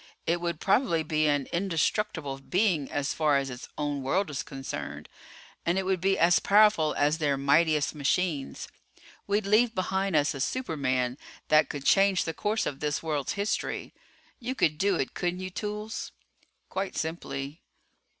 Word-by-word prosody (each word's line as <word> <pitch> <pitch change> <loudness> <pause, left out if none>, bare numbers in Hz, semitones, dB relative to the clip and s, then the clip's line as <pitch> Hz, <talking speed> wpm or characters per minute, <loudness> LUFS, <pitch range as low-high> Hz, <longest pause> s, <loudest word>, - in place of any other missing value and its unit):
It 170 +1 0
would 170 -2 -2
probably 195 -6 +2
be 155 0 +1
an 145 -2 +1
indestructible 170 -4 -1
being 175 -1 0
as 145 0 -1
far 150 -3 +3
as 135 -1 -2
its 125 0 -8
own 145 -2 -2
world 165 +7 0
is 135 -5 -2
concerned. 135 +1 -6 0.6
And 170 +2 +1
it 190 - +1
would 190 -2 0
be 195 +1 +2
as 170 +2 +5
powerful 205 -7 +4
as 150 +3 +2
their 145 -3 +1
mightiest 150 +2 +3
machines. 150 0 -1 0.6
We'd 205 +1 +1
leave 220 +3 +3
behind 190 0 0
us 145 -1 +3
a 140 - -7
superman 130 - -1 0.3
that 155 -2 +5
could 140 -2 -6
change 195 -1 +4
the 165 - -3
course 215 +5 -1
of 135 - -4
this 150 0 -2
world's 150 -4 -1
history. 205 +2 -2 0.5
You 255 +1 -4
could 155 - +1
do 195 0 +2
it, 135 - -2
couldn't 180 +1 -2
you, 185 0 -5
Toolls?" 210 +3 -5 0.6
"Quite 190 +1 -4
simply." 150 -2 -4
160 Hz, 160 wpm, -28 LUFS, 145-195 Hz, 0.6 s, as